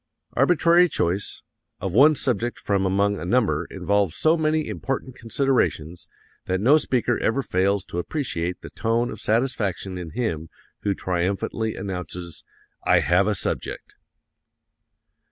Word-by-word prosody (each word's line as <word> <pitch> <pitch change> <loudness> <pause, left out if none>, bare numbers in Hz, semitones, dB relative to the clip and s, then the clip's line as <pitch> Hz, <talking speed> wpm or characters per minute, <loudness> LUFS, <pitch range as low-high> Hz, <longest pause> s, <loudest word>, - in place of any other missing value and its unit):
"Arbitrary 170 +5 +4
choice... 95 - -2 0.4
of 95 -2 -3
one 145 +8 +6
subject 120 -3 -1
from 100 -2 0
among 100 +2 +1
a - - -6
number 110 +5 +1
involves 100 -4 0
so 160 +1 +3
many 155 -1 0
important 130 +6 -4
considerations 115 - -1 0.4
that 95 0 0
no 130 +9 +5
speaker 120 -5 +1
ever 135 +5 0
fails 95 -1 +1
to 85 - -4
appreciate 90 - -3
the - - -10
tone 115 +1 0
of - - -8
satisfaction 105 -5 0
in 85 -2 -6
him 80 -8 -3 0.3
who 100 -1 -1
triumphantly 95 +5 -2
announces: 90 -3 -6 0.4
'I - - +4
have 90 +3 +3
a 105 - +1
subject!' - - -4
105 Hz, 135 wpm, -24 LUFS, 90-125 Hz, 0.4 s, one